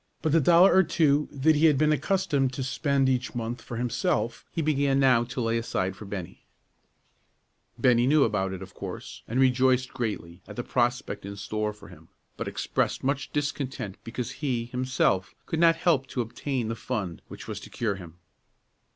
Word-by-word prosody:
But 160 - +1
the 165 - +5
dollar 175 +6 +6
or 190 - +7
two 150 -4 +2
that 145 +3 +3
he 155 +2 +5
had 150 -3 +4
been 155 +2 +3
accustomed 150 -5 +1
to 130 - -3
spend 140 +1 +1
each 130 -1 0
month 120 +1 -3
for 120 - -7
himself 120 - -1
he 165 - -2
began 140 -2 +2
now 130 -3 +5
to 125 +2 -6
lay 115 0 +1
aside 95 -4 -2
for 105 - -10
Bennie. 95 -4 -7 1.3
Bennie 120 -1 +4
knew 150 +1 +5
about 95 -3 0
it, 95 0 -6
of 95 - -12
course, - - -7
and 120 +3 -1
rejoiced 130 0 +3
greatly 105 -8 -4
at 105 - -9
the 120 - -3
prospect 120 +1 -1
in 100 +1 -6
store 105 +1 -2
for 105 - -14
him, 80 -2 -15 0.3
but - - -5
expressed - - -1
much 135 +1 -1
discontent 140 -8 -3
because 120 +1 -4
he, 125 -6 -2
himself, 125 -6 0
could 160 - -2
not 165 -1 +6
help 155 -6 +1
to 130 - -2
obtain 120 +1 -3
the 115 - -2
fund 105 -8 -4
which - - -10
was - - -5
to - - -11
cure 110 -4 -1
him. 85 -4 -10
125 Hz, 185 wpm, -27 LUFS, 110-140 Hz, 1.3 s, or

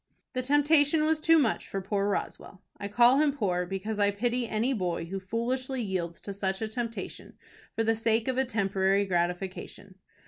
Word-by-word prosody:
The 255 - 0
temptation 290 +3 +3
was 315 0 +1
too 330 0 +5
much 255 -8 +1
for 195 - -3
poor 200 +1 -1
Roswell 195 -1 -4 0.2
I 200 - -4
call 240 +6 +5
him 300 -1 +3
poor, 180 -6 0
because 200 +3 -4
I 200 0 +4
pity 240 +4 -1
any 230 +5 0
boy 175 -6 -2
who 195 +3 -5
foolishly 250 +6 -2
yields 175 -4 -3
to 200 - -6
such 190 -1 -2
a 220 - -2
temptation 230 +1 -6 0.4
for 225 - +1
the 225 0 +2
sake 225 +1 +1
of 260 0 0
a - - +4
temporary 200 -4 +1
gratification. 185 +2 -3
215 Hz, 180 wpm, -28 LUFS, 195-255 Hz, 0.4 s, too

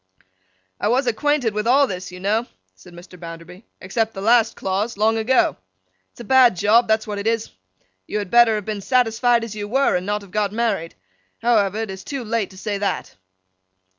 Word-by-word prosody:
'I - - 0
was 255 +5 +2
acquainted 250 -1 0
with 210 +2 -2
all 275 +4 +5
this, 185 -6 -6
you 180 - -10
know,' 215 +5 0 0.3
said 95 - -17
Mr. 180 +1 -13
Bounderby, 165 +3 -10 0.2
'except 220 +4 -2
the - - -6
last 230 +1 +3
clause, 200 +4 -2
long 220 +2 +2
ago. 225 +4 +2 0.5
It's - - -24
a - - -7
bad 255 -2 +5
job; 225 +6 +3
that's 220 0 +1
what 205 -1 -4
it 200 - -3
is. 225 -1 -1 0.6
You - - -3
had 205 -3 -4
better 235 -2 +6
have 210 -2 -4
been 210 -2 -4
satisfied 240 0 +2
as 230 -2 -6
you 205 -1 -5
were, 270 +5 +2
and 180 +1 -2
not 205 0 -2
have 195 - -15
got 210 -1 0
married. 215 -8 -1 0.5
However, 215 -3 +2
it's 190 -3 -7
too 275 -3 -5
late 225 -2 -2
to 190 - -15
say 205 0 -3
that. 200 - -3
215 Hz, 195 wpm, -21 LUFS, 195-235 Hz, 0.6 s, better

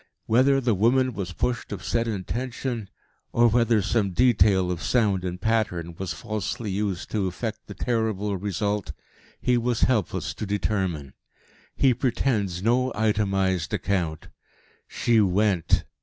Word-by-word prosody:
Whether 130 +4 +4
the 120 -4 +1
woman 125 +6 +2
was 95 -3 -4
pushed 120 +7 -2
of - - -5
set 115 0 0
intention, 115 +2 -3 0.4
or 120 0 +4
whether 115 -2 +3
some 100 -2 0
detail 100 -6 +4
of 85 -2 -4
sound 105 -7 +1
and 90 -1 -4
pattern 95 -7 -1
was 95 +1 -4
falsely 110 +1 -4
used 95 -2 -2
to 100 -3 0
effect 105 +5 -4
the - - -8
terrible 110 -4 -1
result, 100 -2 -2 0.5
he 125 -1 +2
was 120 -1 -1
helpless 110 -9 +1
to 105 - -5
determine. 95 -8 -2 0.6
He 135 -2 +4
pretends 110 -7 -1
no 125 +3 +2
itemised 95 -5 +1
account. 85 -5 -2 0.6
She 115 -2 +2
went. 95 -2 +2
105 Hz, 135 wpm, -25 LUFS, 95-120 Hz, 0.6 s, Whether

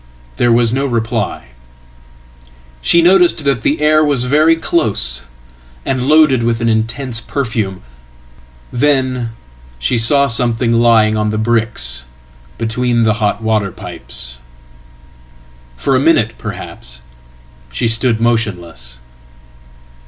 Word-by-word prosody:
There 120 - +2
was 115 0 +3
no 135 +2 0
reply. 115 - -3 1.3
She 170 - +3
noticed 175 -3 +4
that 135 -5 +1
the 150 +6 0
air 155 0 +4
was 140 -5 +2
very 155 +5 +3
close, 100 - 0 0.6
and 130 -1 -1
loadedwith 130 -7 +3
an 115 - -1
intense 115 +2 -1
perfume. 110 - -3 0.9
Then 130 -3 0 0.4
she 65 - 0
saw 140 +5 +3
something 120 -1 0
lying 115 -2 +3
on 105 0 0
the 110 - -2
bricksbetween 110 - -2
the 110 -1 +3
hot 105 +1 -1
water 110 -3 0
pipes. 65 -6 -8 1.4
For - - 0
a - - +3
minute, - - +2
perhaps, 60 0 -8 0.7
she 60 - -2
stood 115 0 +2
motionless. 90 - -2
115 Hz, 110 wpm, -15 LUFS, 105-130 Hz, 1.4 s, noticed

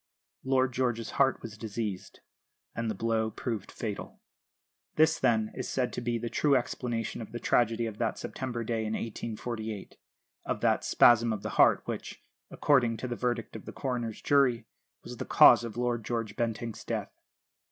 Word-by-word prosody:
Lord 130 -1 +2
George's 120 -3 -1
heart 135 -2 +2
was 110 -2 -8
diseased, 105 -3 -5 0.5
and 115 -1 -2
the 110 - -2
blow 110 +1 0
proved 110 -2 -4
fatal. 105 -3 -6 0.8
This, 160 +1 +4
then, 110 -2 +2
is - - -5
said 125 -2 -1
to - - -3
be 120 0 -1
the 120 +1 -4
true 140 +4 +2
explanation 120 -3 -2
of 110 - -8
the 120 - -5
tragedy 115 0 +2
of 110 -2 -6
that 115 -2 0
September 120 -3 -4
day 115 0 -1
in 110 0 -2
1848; 110 -1 -5 0.5
of - - -3
that - - +2
"spasm 115 -1 +5
of 105 -2 -3
the - - -3
heart" - - +4
which, - - -6 0.3
according 120 -6 +2
to 125 - -4
the 120 - -3
verdict 120 -2 -2
of 110 - -8
the - - -7
coroner's 120 -5 -4
jury, 125 -5 +3 0.4
was - - -8
the - - -3
cause - - +7
of 115 -1 -6
Lord 120 -2 -1
George 115 -1 -3
Bentinck's 115 -1 -3
death. - - -3
115 Hz, 175 wpm, -29 LUFS, 110-125 Hz, 0.8 s, cause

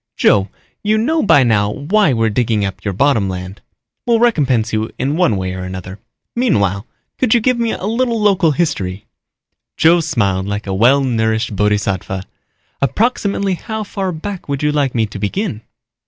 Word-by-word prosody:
"Joe, 100 -1 +3 0.3
you 215 +1 +1
know 310 +9 +1
by 145 - +5
now 105 -4 +2
why 170 - +1
we're 115 -3 +1
digging 110 -2 0
up 95 - -6
your 100 - -1
bottom 110 -1 +2
land. 90 +1 -6 0.5
We'll 235 -1 +4
recompense 135 - +2
you 110 +1 -1
in 135 +4 -1
one 170 - +2
way 95 -1 -3
or 95 - -6
another. 95 +1 -7 0.4
Meanwhile, 100 - +1 0.3
could 250 -3 +3
you - - +5
give 250 +1 +1
me 230 -1 +1
a - - -6
little 230 +1 0
local 195 -5 +3
history?" 100 - -2 0.7
Joe 170 +2 +5
smiled 100 - 0
like 100 +1 -3
a 95 - -3
well 125 +8 +4
nourished 110 -3 0
bodhisattva. 100 -2 -1 0.6
"Approximately 200 - 0
how 220 +4 -4
far 195 -2 -3
back 180 +1 -7
would 140 0 -2
you 150 - +2
like 140 -4 0
me 115 -2 +2
to 105 - -8
begin?" 130 - -2
130 Hz, 170 wpm, -17 LUFS, -, 0.7 s, by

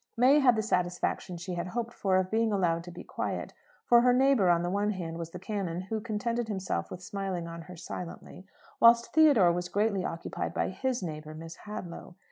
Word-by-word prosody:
May 260 +5 +6
had 255 -4 +5
the 220 - 0
satisfaction 180 -2 -1
she 180 +2 -5
had 175 +1 -3
hoped 235 +4 -3
for, 190 -2 +1
of 185 0 0
being 225 0 +2
allowed 170 -4 +1
to 175 - -8
be - - -9
quiet; - - -4 0.3
for 240 -1 +6
her 250 0 +4
neighbour 260 -7 +4
on 170 0 +3
the 175 - -1
one 205 +2 +1
hand 170 -5 -4
was 165 -1 -5
the 180 - -8
canon, 185 -2 -3
who 215 +3 -4
contented 230 +1 -2
himself 190 -3 -3
with 180 - -8
smiling 190 -3 -4
on 165 0 -7
her 180 +2 -11
silently, 180 +2 -8 0.3
whilst 235 0 +6
Theodore 285 - +6
was 175 +1 -3
greatly 205 -2 +1
occupied 165 - -4
by - - 0
his 260 -5 -2
neighbour, 155 -2 -6
Miss 165 +1 -8
Hadlow. 180 -4 -7
190 Hz, 205 wpm, -29 LUFS, 175-225 Hz, 0.3 s, May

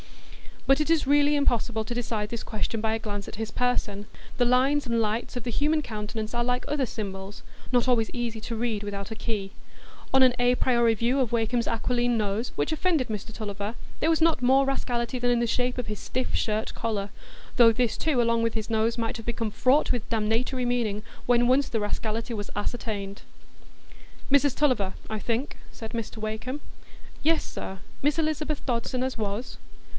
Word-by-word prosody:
But 270 +1 +5
it 305 - 0
is 330 -3 +3
really 290 +1 +4
impossible 235 -5 +1
to 230 - -4
decide 225 -3 -2
this 235 0 -4
question 220 0 -3
by 220 0 +1
a - - -2
glance 205 -2 -4
at - - -7
his 220 0 -4
person; 210 -5 -1 0.3
the 245 - +4
lines 265 +4 +3
and 235 -1 +1
lights 220 +3 -1
of 245 - -3
the 240 - -3
human 305 +5 +2
countenance 215 -2 -5
are 240 0 +1
like 245 +1 0
other 290 -2 +1
symbols,—not 205 +3 -3
always 235 -3 +3
easy 235 -2 -3
to 230 - -4
read 225 -2 -1
without 200 0 -5
a - - -3
key. 210 -4 -3 0.6
On 265 0 +7
an 255 -1 +6
a 245 0 +4
priori 235 -3 +3
view 240 +5 +1
of 250 -4 +1
Wakem's 235 0 +1
aquiline 240 +1 +1
nose, 210 +2 -1
which - - 0
offended 315 -5 +1
Mr 215 +1 -5
Tulliver, 205 0 -4 0.2
there 320 - +2
was 325 0 +3
not 325 -5 +4
more 265 +2 +5
rascality 250 -2 -1
than 245 0 +1
in 240 -1 +3
the 235 - +2
shape 250 +2 0
of 250 -2 -3
his 210 -1 -4
stiff 255 0 -2
shirt 215 0 0
collar, 210 -3 -2 0.5
though 235 -2 +8
this 235 0 0
too 295 -6 +2
along 230 0 +2
with 230 -1 +1
his 220 -1 -3
nose, 225 +1 +1
might 230 +1 -1
have 225 - -9
become 230 -2 -2
fraught 255 +7 +3
with 245 -2 -2
damnatory 230 +3 0
meaning 225 -4 0 0.2
when 240 0 +4
once 270 +3 +3
the 225 - 0
rascality 220 +3 -2
was 205 -2 -4
ascertained. 205 -2 -3 1.1
"Mrs 280 -1 +4
Tulliver, 245 -10 +2 0.2
I 220 - -2
think?" 235 +6 -2
said 225 -1 -8
Mr 230 -1 -4
Wakem. 220 +6 -4 0.6
"Yes, 320 +1 +3
sir; 190 0 -6 0.2
Miss 290 +3 +2
Elizabeth 310 -1 -1
Dodson 250 0 -1
as 260 -1 -2
was." 215 +3 -3
235 Hz, 190 wpm, -27 LUFS, 220-255 Hz, 1.1 s, though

